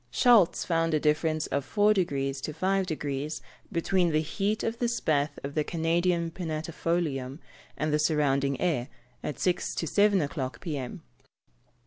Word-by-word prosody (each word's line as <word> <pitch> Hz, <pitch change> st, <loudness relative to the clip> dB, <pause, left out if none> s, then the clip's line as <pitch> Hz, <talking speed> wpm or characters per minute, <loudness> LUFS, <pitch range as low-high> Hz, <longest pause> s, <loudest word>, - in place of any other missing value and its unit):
Schultz 215 Hz, -, +4 dB
found 165 Hz, -2 st, +1 dB
a -, -, +2 dB
difference 155 Hz, +1 st, +1 dB
of 140 Hz, 0 st, -1 dB
4 210 Hz, +8 st, +3 dB
deg. 185 Hz, -4 st, +1 dB, 0.3 s
to 155 Hz, -, -4 dB
5 190 Hz, +4 st, +1 dB
deg. 150 Hz, -3 st, -3 dB, 0.4 s
between 175 Hz, 0 st, +1 dB
the 155 Hz, -1 st, +2 dB
heat 200 Hz, +7 st, -1 dB
of 225 Hz, +1 st, -2 dB
the 240 Hz, -, +1 dB
spathe 150 Hz, -10 st, 0 dB
of 140 Hz, +1 st, -5 dB
the 150 Hz, -, +1 dB
Canadian 170 Hz, +1 st, 0 dB
pinnatifolium 160 Hz, -4 st, -2 dB, 0.4 s
and 155 Hz, 0 st, -1 dB
the 150 Hz, -, +3 dB
surrounding 140 Hz, -3 st, +1 dB
air, 145 Hz, -9 st, 0 dB, 0.4 s
at 145 Hz, -, -4 dB
six 180 Hz, -1 st, 0 dB
to -, -, -2 dB
seven 200 Hz, +4 st, +3 dB
o'clock 140 Hz, -4 st, -3 dB
p.m. 145 Hz, -8 st, -5 dB
160 Hz, 150 wpm, -28 LUFS, 145-180 Hz, 0.4 s, Schultz